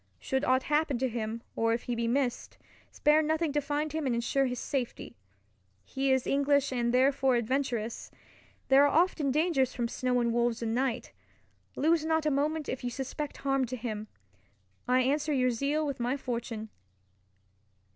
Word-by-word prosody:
Should 265 - -2
aught 260 -1 +2
happen 300 -2 +1
to 260 +2 0
him, 230 -1 -4
or 225 0 +2
if 235 - -6
he 245 - -3
be 235 0 -1
missed, 250 0 -1 0.3
spare 300 +1 +3
nothing 315 0 0
to 295 - +1
find 295 +1 -2
him 315 -3 -1
and 245 - +1
ensure 260 +3 +1
his 250 0 -3
safety. 255 -1 -4 0.7
He 270 0 -1
is 260 -1 +2
English 280 -1 +2
and 240 -1 0
therefore 265 +1 +3
adventurous. 235 -2 -2 0.6
There 270 +1 +7
are - - +6
often 335 -6 0
dangers 280 -3 +1
from 240 -2 -1
snow 250 +1 0
and 235 -1 +1
wolves 235 -1 0
and 225 -1 -1
night. 255 0 -1 0.6
Lose 320 +1 +2
not 320 0 +1
a 305 - +2
moment 300 +2 0
if 255 - -4
you 245 - -1
suspect 270 +4 -5
harm 270 -1 +2
to 250 +1 -5
him. 220 -3 -5 0.8
I 255 +1 +4
answer 295 +4 +1
your 255 -2 +2
zeal 280 +6 0
with 280 -3 -3
my 245 +3 0
fortune. 235 -4 -4
265 Hz, 175 wpm, -29 LUFS, 240-290 Hz, 0.8 s, There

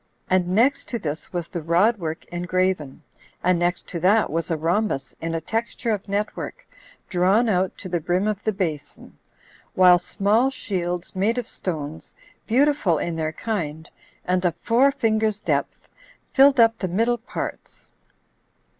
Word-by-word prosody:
And 185 -1 +3
next 230 +10 +2
to 240 - -2
this 155 -6 -5
was 175 -2 -3
the 175 -4 -5
rod 185 +8 +3
work 160 -2 -5
engraven; 180 -4 -1 0.4
and 180 -1 +3
next 175 +1 -1
to 170 - -3
that 195 +1 +3
was 165 +2 -2
a 165 - 0
rhombus 165 - -1
in 165 0 -2
a - - 0
texture 225 +5 -2
of 205 -1 -3
net 205 +2 -1
work, - - -7 0.4
drawn 195 +6 +3
out 190 -3 0
to 190 - -7
the 175 -1 -1
brim 180 +5 0
of 210 -1 -2
the 215 - +1
basin, 160 -8 -5 0.6
while 180 -1 +7
small 210 +8 +1
shields, 180 -10 -4
made 210 +6 +1
of 245 -2 -2
stones, 160 -3 -6 0.3
beautiful 260 - +3
in 170 +2 -2
their 155 -1 -1
kind, 160 -5 -4 0.3
and 180 0 +1
of 175 -2 +1
four 255 +4 +4
fingers' 220 -4 0
depth, - - -2 0.5
filled 275 -1 +6
up 230 -1 +5
the 185 - -1
middle 230 +7 +1
parts. 230 - -7
185 Hz, 160 wpm, -23 LUFS, 170-220 Hz, 0.6 s, while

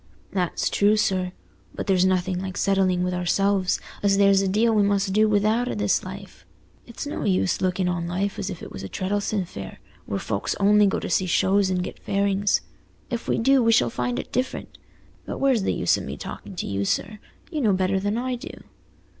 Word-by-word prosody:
"That's 180 -3 -1
true, 205 +1 +3
sir, 185 -3 0 0.4
but - - -4
there's 185 -2 +3
nothing 185 0 0
like 185 -1 -5
settling 190 -2 +2
with 180 0 -1
ourselves 190 +1 +1 0.2
as 200 -1 +3
there's 200 -1 +5
a 195 - 0
deal 220 +4 +2
we 210 - +4
must 200 -1 +1
do 215 +1 +4
without 215 +4 +2
i' - - -2
this 105 -1 +1
life. - - -10 0.4
It's - - -7
no - - -4
use 95 0 +1
looking 185 0 0
on 175 -1 -1
life 190 +4 -2
as 200 -1 -3
if 180 -4 -7
it - - -8
was 95 - -7
Treddles'on 195 - -2
Fair, 100 - -8 0.3
where 100 - -2
folks 100 0 -2
only 205 +1 +5
go 195 - 0
to - - -5
see 185 +2 +1
shows 195 +2 +2
and 180 -1 0
get - - -7
fairings. 200 0 +1 0.5
If 235 -1 -3
we - - +1
do, 270 +3 +4
we 230 -1 +4
shall 120 - +3
find 125 0 -2
it - - -6
different. 255 +1 -3 0.5
But - - -4
where's 265 -5 +2
the - - 0
use - - +2
o' - - -5
me - - -6
talking 195 - -8
to - - -3
you, 100 0 -2
sir? 205 - -2 0.3
You 310 -3 -2
know 215 -5 +3
better 190 +1 +1
than 205 +3 -1
I 250 +1 -2
do." 285 +7 -10
195 Hz, 210 wpm, -24 LUFS, 180-205 Hz, 0.5 s, there's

